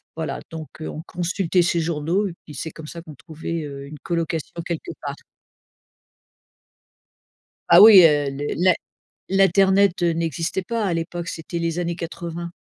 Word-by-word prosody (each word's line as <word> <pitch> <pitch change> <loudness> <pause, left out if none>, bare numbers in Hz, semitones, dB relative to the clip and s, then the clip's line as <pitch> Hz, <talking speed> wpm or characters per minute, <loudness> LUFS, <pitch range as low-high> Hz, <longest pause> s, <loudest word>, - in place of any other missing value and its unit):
voilà 160 -1 -4
donc, 160 -2 -7
heu, - - -4
on 155 - -6
consultait 180 0 0
ces 170 0 +1
journaux 165 +5 0
et - - -8
puis 150 - -11
c'est 160 +4 -5
comme 160 0 -11
ça 170 +2 -8
qu'on 155 -3 -12
trouvait, 160 +3 -6
heu, 140 -1 -8
une 150 +1 -10
colocation 165 -1 -3
quelque 175 - -4
part. - - -5 2.5
Ah - - +9
oui, 205 -4 +10
heu, 145 -3 +4
le 140 +2 -4
l'in 180 +1 +4 0.6
l'internet, 195 0 +3
heu, 170 -1 +2
n'existait 165 +3 -2
pas 230 +3 -2
à 180 - 0
l'époque, 170 +1 -4
c'était 170 0 -5
les 165 0 -2
années 170 -1 -2
80. 170 0 -6
170 Hz, 160 wpm, -22 LUFS, 160-180 Hz, 2.5 s, oui